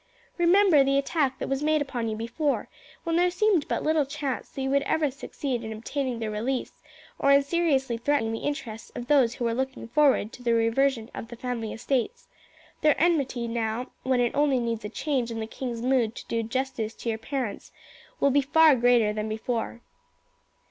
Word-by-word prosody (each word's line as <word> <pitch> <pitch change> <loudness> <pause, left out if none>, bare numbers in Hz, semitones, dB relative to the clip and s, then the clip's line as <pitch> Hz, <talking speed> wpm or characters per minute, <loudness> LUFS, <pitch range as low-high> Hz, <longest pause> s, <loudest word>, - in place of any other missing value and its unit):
Remember 345 -3 +5
the 275 0 +2
attack 280 -1 0
that - - -4
was 270 0 -1
made 310 +1 +2
upon 255 -5 -3
you 215 - -2
before, 245 +7 -2 0.3
when 330 -1 0
there 355 +1 +4
seemed 360 -3 +2
but - - -1
little 310 -1 +2
chance 280 -2 -4
that 270 - -6
you 265 - -1
would 280 0 +3
ever 295 0 0
succeed 260 -2 -4
in 220 - -5
obtaining 250 +3 -3
their 220 -2 -3
release 240 +5 -3 0.4
or 280 - +4
in 280 0 +6
seriously 275 -6 +1
threatening 240 -3 +1
the 225 - -3
interests 230 -6 -5
of 240 - -5
those 255 -4 +3
who 240 - -3
were 230 - +1
looking 265 0 -3
forward 270 -4 +3
to - - -11
the 235 -1 +2
reversion 230 +1 +1
of - - -7
the 240 - -9
family 235 -2 -4
estates. 265 - -2 0.5
Their 300 -2 +3
enmity 280 -8 +1
now, 230 +1 -2
when 260 -1 +1
it 240 -1 +1
only 285 -2 +2
needs 230 -2 -2
a 210 - -4
change 255 0 -1
in 230 -1 -4
the 220 - -3
king's 235 0 -5
mood 250 -3 +1
to - - -9
do 230 - -1
justice 230 -1 -3
to 235 - -5
your 220 -1 -2
parents, 255 -3 -4 0.5
will 280 - +3
be 285 +2 +4
far 310 +1 +5
greater 240 -3 +3
than 215 0 -3
before. 230 +1 -3
260 Hz, 195 wpm, -26 LUFS, 230-285 Hz, 0.5 s, in